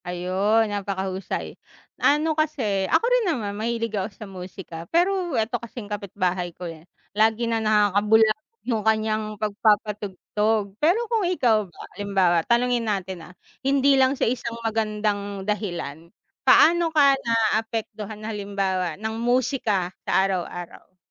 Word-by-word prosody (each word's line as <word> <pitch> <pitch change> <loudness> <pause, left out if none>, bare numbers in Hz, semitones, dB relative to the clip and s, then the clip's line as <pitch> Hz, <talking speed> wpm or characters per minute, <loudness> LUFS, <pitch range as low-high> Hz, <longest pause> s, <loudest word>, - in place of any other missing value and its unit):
Ayon, 185 +5 +1
napakahusay. 195 -1 -3 0.5
Ano 305 +2 +3
kasi, 250 -11 0
ako - - +3
rin - - +3
naman 220 -10 -2
mahilig 230 +1 -2
ako 195 -2 -1
sa 215 +1 -11
musika, 185 -2 -9
pero 355 -2 +1
eto 225 +1 -1
kasing 235 -1 -8
kapitbahay 185 -3 -2
ko, 180 - -7
eh, 165 0 -9 0.2
lagi 220 +3 +2
na 230 -1 0
lang 215 - 0
nakakabulabog 215 - +3
yung 230 -4 0
kanyang 215 0 0
pagpapatugtog. 210 0 0
Pero 365 +10 +3
kung 455 -1 0
ikaw 225 - +2
ba, 170 - -24 0.2
halimbawa, 195 -4 +2
tanungin 240 -1 +2
natin, 190 -4 -4
ah, - - -15 0.3
hindi 275 +1 +3
lang 265 0 +3
sa - - +1
isang 235 -1 -2
magandang 210 -3 -1
dahilan, 175 -7 -4 0.3
paano 340 0 +5
ka 290 -3 +5
naapektuhan 220 -2 -1
halimbawa, 195 -5 -2
ng 220 +2 -4
musika 235 -7 0
sa - - 0
araw-araw? 180 -1 -5
215 Hz, 130 wpm, -24 LUFS, 195-235 Hz, 0.5 s, paano